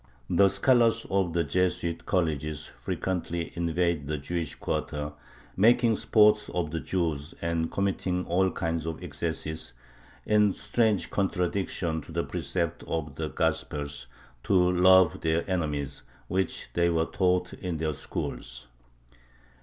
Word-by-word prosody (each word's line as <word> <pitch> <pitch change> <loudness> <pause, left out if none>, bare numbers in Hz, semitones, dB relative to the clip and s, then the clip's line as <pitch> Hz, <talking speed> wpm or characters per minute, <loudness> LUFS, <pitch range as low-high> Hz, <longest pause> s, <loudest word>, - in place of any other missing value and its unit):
The 100 - +6
scholars 115 +1 +3
of 95 -3 +1
the 85 0 +2
Jesuit 85 +1 -1
colleges 75 -5 -1 0.2
frequently 85 0 -2
invaded 85 -3 0
the 75 +1 -1
Jewish 80 +2 -3
quarter, 75 0 -3 0.4
making 115 +2 +5
sport 105 0 +4
of 85 -4 -1
the 80 - -2
Jews 80 -4 -2
and 85 -1 -1
committing 95 -2 -1
all 95 +2 +2
kinds 80 -2 -2
of 80 +2 -5
excesses, 80 -3 -4 0.5
in 105 -2 +4
strange 105 0 0
contradiction 90 -3 -1
to 80 - -12
the 85 +1 -1
precept 85 0 -2
of 75 -3 -3
the 80 +1 -3
Gospels, 75 -5 -2 0.4
to 100 - +2 0.2
love 90 -1 +5
their 80 +1 0
enemies, 75 -7 -2 0.3
which 95 +3 -2
they 85 0 +3
were 80 -1 +2
taught 90 0 +1
in 90 -3 -4
their 80 0 -1
schools. 65 -2 -5
85 Hz, 130 wpm, -28 LUFS, 80-95 Hz, 0.5 s, The